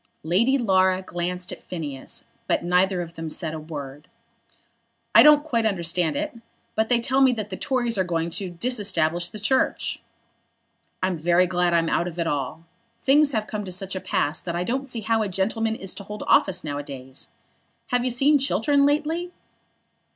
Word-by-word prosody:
Lady 220 - +3
Laura 190 -5 +2
glanced 180 0 -4
at - - -8
Phineas; 145 -7 -6 0.2
but - - +1
neither 180 +1 +2
of 170 0 -11
them 165 -1 -5
said 160 0 -4
a 160 - -4
word. 145 -2 -8 1.1
"I - - +9
don't 300 -1 +7
quite 240 -7 0
understand 175 -5 0
it; 300 -1 -3 0.4
but 220 0 0
they 245 -1 +4
tell 265 +3 +1
me 260 -2 +6
that 215 -3 -5
the - - -3
Tories 240 -3 0
are - - +4
going 170 -1 -2
to 190 +2 -2
disestablish 175 -5 0
the 215 - -9
Church. 240 +6 0 1.0
I'm 185 -3 0
very 175 +3 +4
glad 175 -1 +1
I'm 165 -1 +2
out 170 - +1
of 175 -1 -7
it 170 - 0
all. 145 +1 -2 0.4
Things 285 +2 +5
have 215 -2 0
come 210 -1 -4
to 190 - -7
such 190 +1 -4
a 185 - -3
pass 150 +2 -1
that 170 -1 -4
I 175 - 0
don't 265 +7 -2
see 235 -2 -4
how 225 +1 +1
a 210 - -1
gentleman 220 +4 0
is 195 -4 -4
to 200 - -7
hold 210 +2 -7
office 190 - +3
now 145 -2 -3
a - - -5
days. 135 -2 -8 0.6
Have 245 -1 +1
you 255 - +1
seen 275 +4 +3
Chiltern 280 +1 +2
lately?" 320 +4 0
190 Hz, 190 wpm, -24 LUFS, 170-240 Hz, 1.1 s, I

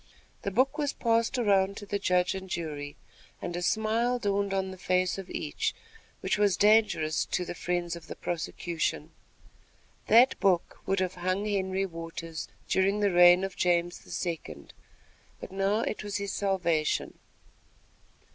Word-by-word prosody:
The - - -2
book 260 +9 +1
was 290 -2 0
passed 230 +2 +1
around 200 -4 +2
to 205 - -7
the 200 0 -2
Judge 180 -2 +2
and 190 0 -7
Jury, 150 -4 -4 0.4
and 175 - -5
a 175 - -3
smile 225 +5 +1
dawned 200 -3 0
on 190 -1 -1
the 185 - -9
face 185 +1 +1
of 190 - -8
each, 150 - -2 0.5
which - - 0
was 205 -2 +3
dangerous 205 -7 +3
to 180 - -2
the 175 - -5
friends 175 0 -2
of 170 - -11
the - - -7
prosecution. 170 -1 -3 1.0
That 240 +4 +6
book 180 -3 +1
would 195 0 +1
have 185 -1 -1
hung 185 +3 -1
Henry 195 -2 0
Waters 165 -2 -6 0.2
during 195 +2 +2
the 205 -1 +2
reign 175 +1 +7
of 195 -1 -4
James 175 0 +1 0.3
II.; 80 - -6 0.7
but - - -9
now 195 +3 +1
it 215 - -3
was 205 -1 -3
his 200 -1 -4
salvation. 175 -6 0
190 Hz, 155 wpm, -29 LUFS, 175-205 Hz, 1.0 s, reign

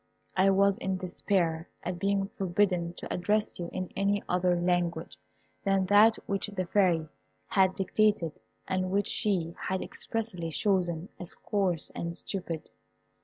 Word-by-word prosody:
I 190 +1 +5
was 195 0 +4
in 190 -1 -1
despair 175 -2 -1
at 175 0 -3
being 195 0 +1
forbidden 180 -3 0
to - - -5
address 210 +4 0
you 170 -1 -4
in 185 -1 -4
any 200 +1 +1
other 180 -1 +2
language 175 -1 0 0.5
than 195 -1 +2
that 215 +2 +7
which 200 +1 -1
the 195 -3 -3
Fairy 175 -4 +2 0.4
had 190 -2 +3
dictated, 195 -4 +1 0.3
and 185 0 0
which 200 +2 +1
she 175 -5 0
had 190 0 -1
expressly 210 -7 -3
chosen 175 +1 0
as 180 - -3
coarse 185 -6 -1
and 170 0 -3
stupid. 175 -5 -4
185 Hz, 140 wpm, -29 LUFS, 175-200 Hz, 0.5 s, that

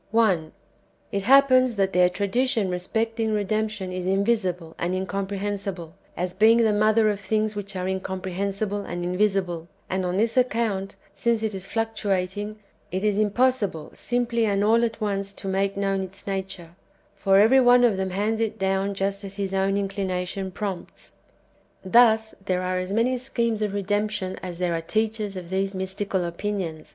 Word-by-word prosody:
1. 195 -8 +2 0.6
It 200 -2 -1
happens 255 +1 +5
that 195 -1 +1
their 180 0 +5
tradition 200 +2 0
respecting 220 +5 -1
redemption^ 210 -2 -2
is 185 0 -3
invisible 190 -4 0
and 175 +2 -1
incomprehensible, 195 -2 -3 0.2
as 180 +1 -2
being 220 +4 +5
the 220 -2 +3
mother 215 +1 +3
of 200 - -4
things 215 +1 -1
which 200 -1 -5
are 185 0 -2
incomprehensible 190 +2 -2
and 175 -1 -5
invisible; 180 -3 0 0.2
and 190 0 0
on 180 +1 -1
this 225 +4 +1
account, 225 -6 0 0.2
since 230 +2 0
it 220 -1 -1
is 190 0 -5
fluctuating, 205 -2 -2 0.3
it 185 +2 -2
is 210 -1 +2
impossible 215 -6 +1
simply 240 -1 -1
and 200 -1 +1
all 230 +3 +4
at 230 -1 -1
once 200 -2 -2
to 195 - -8
make 195 +1 0
known 195 -1 0
its 190 +1 -8
nature, 190 -3 -4 0.4
for 195 0 +3
every 230 +6 +6
one 245 -1 +6
of 235 -4 +4
them 190 0 -2
hands 210 +4 -1
it 225 -1 -1
down 195 0 0
just 195 +1 -2
as 195 0 -7
his 195 -1 -3
own 195 +1 +1
inclination 195 -1 -2
prompts. 190 -1 -6 0.7
Thus 220 +1 +5
there 185 -2 -1
are 185 0 -1
as 185 +1 -4
manv 230 +5 +2
sciiemes 235 -3 -1
of 205 -1 -1
"redemption" 205 -1 -1
as 180 -2 -6
there 180 -1 0
are 165 - -1
teachers 215 +2 -1
of 180 -1 -8
these 195 +1 -1
mystical 190 0 -2
opinions. 170 -3 -4
200 Hz, 165 wpm, -25 LUFS, 190-220 Hz, 0.7 s, every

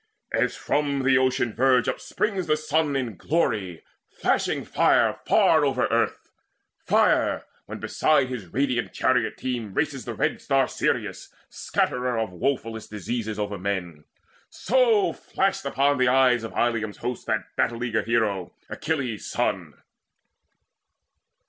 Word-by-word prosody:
As - - +1
from 140 -2 -1
the 130 0 +4
ocean 130 -3 +1
verge 130 -1 +3
upsprings 195 -5 -2
the 155 0 +2
sun 155 -1 0
In 120 -7 -2
glory, 105 - -1 0.3
flashing - - -1
fire - - +2
far - - +4
over - - +1
earth - - -1 0.5
Fire, - - +2 0.2
when - - -7
beside 145 -4 +2
his 125 -7 -6
radiant 125 +4 -1
chariot 125 -3 +1
team 120 -6 -4
Races 145 -4 -1
the 120 - -5
red 150 +3 -1
star 135 -2 +2
Sirius, - - -2 0.2
scatterer 125 -1 -1
Of 110 -4 -2
woefullest 115 +1 -3
diseases 110 +1 -4
over 105 -2 -3
men; 90 -6 -4 0.4
So 230 -3 +2
flashed 195 -6 -1
upon 140 0 +1
the 130 - +4
eyes 125 -2 +4
of 115 - -6
Ilium's 110 -3 0
host 125 -1 -5
That - - -2
battle 120 0 0
eager 110 -3 0
hero, 105 -5 -1 0.2
Achilles' 140 -9 -3
son. - - -2
125 Hz, 130 wpm, -25 LUFS, 110-140 Hz, 0.5 s, the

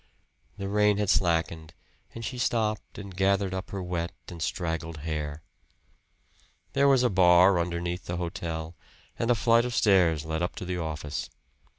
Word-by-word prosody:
The 100 - -4
rain 105 0 +3
had 105 -2 +1
slackened 80 -3 0 0.4
and 115 0 -5
she 125 +1 -5
stopped 110 -3 -1
and 100 -3 -8
gathered 95 0 +1
up 95 0 -4
her 95 -2 -4
wet 85 -1 -3 0.2
and 85 -3 -9
straggled 80 -3 -3
hair. 75 -1 -4 1.3
There 140 +1 +4
was 135 -2 +5
a 125 - +4
bar 90 0 +6
underneath 85 +1 -3
the 85 - -3
hotel, 85 -1 -4 0.4
and 115 - 0
a 120 - +5
flight 115 +1 +4
of 125 -1 -3
stairs 90 -7 +3
led 80 +1 -2
up 90 - -2
to - - -6
the 90 0 -3
office. 75 -3 -4
90 Hz, 165 wpm, -27 LUFS, 80-105 Hz, 1.3 s, bar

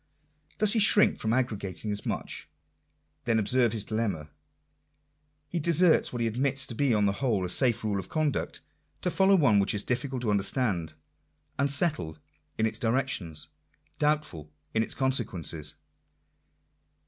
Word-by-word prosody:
Does 210 0 +2
he 230 - +2
shrink 210 0 +4
from 110 - -1
arrogating 105 -5 -2
as 105 - -5
much? - - -4 0.8
Then 115 -1 +2
observe 120 +2 +2
his 110 -2 -4
dilemma. 100 -10 -3 1.2
He 175 - -3
deserts 170 +1 +3
what 120 - -4
he - - +1
admits 130 +3 0
to 120 - -7
be 140 +3 +1
on 105 -2 +3
the 100 - +3
whole 105 -4 -1
a - - -4
safe 120 +2 +1
rale 105 -2 -1
of 95 - -7
conduct, 155 -3 -1 0.4
to 180 - 0
follow 195 +2 +4
one 140 - +4
which 100 +1 +1
is 100 - +1
difficult 130 0 -2
to 110 - +1
understand; 95 - 0 0.6
unsettled 140 - +1 0.4
in 110 - +2
its 110 0 -2
direc 130 +3 +1
tions; 80 - -2 0.5
doubtful 150 - -1 0.2
in 110 - +2
its 115 - -1
consequences. 95 - -1
115 Hz, 150 wpm, -28 LUFS, 100-140 Hz, 1.2 s, shrink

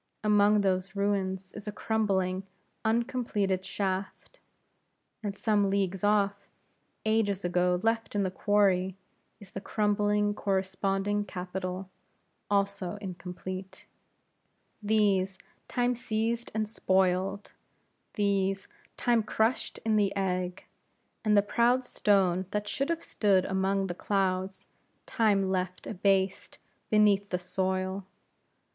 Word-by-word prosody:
Among 210 0 +4
those 190 0 0
ruins 190 -2 -1
is 210 0 -9
a - - -1
crumbling, 195 -4 0 0.4
uncompleted 220 -5 0
shaft, 195 - -4 0.8
and 200 -2 -4
some 205 -2 +2
leagues 195 -1 0
off, 200 -1 +1 0.6
ages 205 -3 +1
ago 180 0 +2
left 225 -1 0
in 200 - +2
the 185 - -1
quarry, 190 -2 +2 0.4
is 205 -3 -14
the 195 - -6
crumbling 205 0 +1
corresponding 195 +1 0
capital, 185 0 -5 0.6
also 200 -2 0
incomplete. 185 -1 -7 1.0
These 200 -3 +2 0.3
Time 245 0 +1
seized 230 0 -2
and 215 -1 0
spoiled; 190 -1 +1 0.6
these 195 -1 +1 0.3
Time 235 -2 +3
crushed 220 +3 0
in 220 -1 +3
the 200 -2 +2
egg; 185 -2 -2 0.6
and 210 -2 +4
the 200 - +6
proud 240 +4 +2
stone 190 -5 +2
that 210 +1 -2
should 275 +7 -1
have 335 -1 -1
stood 195 -3 +2
among 195 +1 0
the 180 - -3
clouds, 190 0 -1 0.4
Time 200 -5 +2
left 185 -1 -2
abased 195 -1 0 0.3
beneath 205 -2 +4
the 180 - 0
soil. 185 +1 -2
200 Hz, 110 wpm, -29 LUFS, 190-210 Hz, 1.0 s, the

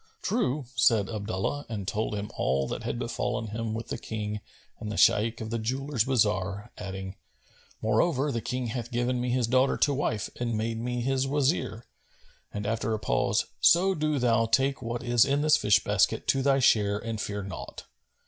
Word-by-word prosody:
"True," 155 - 0
said 115 -5 +3
Abdullah 110 +6 -3
and 100 -4 -5
told 105 +1 -1
him 105 0 -5
all 65 0 0
that - - -4
had - - -3
befallen 110 - -2
him 110 +1 -3
with 115 +1 -6
the - - -3
King 105 -1 -4 0.4
and 105 - -5
the - - -4
Shaykh 110 +2 +4
of 110 0 -5
the 115 - -1
jewellers' 130 +1 -1
bazar, 105 -5 0
adding 95 0 -6 0.7
"Moreover, 135 +6 +2
the 115 - -2
King 125 +2 -3
hath 120 +1 -4
given 120 +1 0
me 125 - -1
his 125 -1 +1
daughter 130 +3 +2
to 145 - +2
wife 115 -6 -2
and 120 -2 -1
made 115 +1 -2
me 125 +1 -2
his 135 +1 0
Wazir;" 135 -5 0 0.7
and, 105 0 -5
after 115 +1 -1
a - - -4
pause, - - +1
"So 190 +3 +5
do 155 -3 0
thou 115 -3 +2
take 135 +4 +2
what 120 0 -4
is 120 -2 +4
in 140 +1 +1
this 155 0 +5
fish 105 -1 +3
basket - - +1
to 135 - +3
thy 135 0 +3
share 105 -6 +3
and 110 -1 -4
fear 100 0 -3
naught." 95 -1 -8
115 Hz, 185 wpm, -28 LUFS, 105-130 Hz, 0.7 s, So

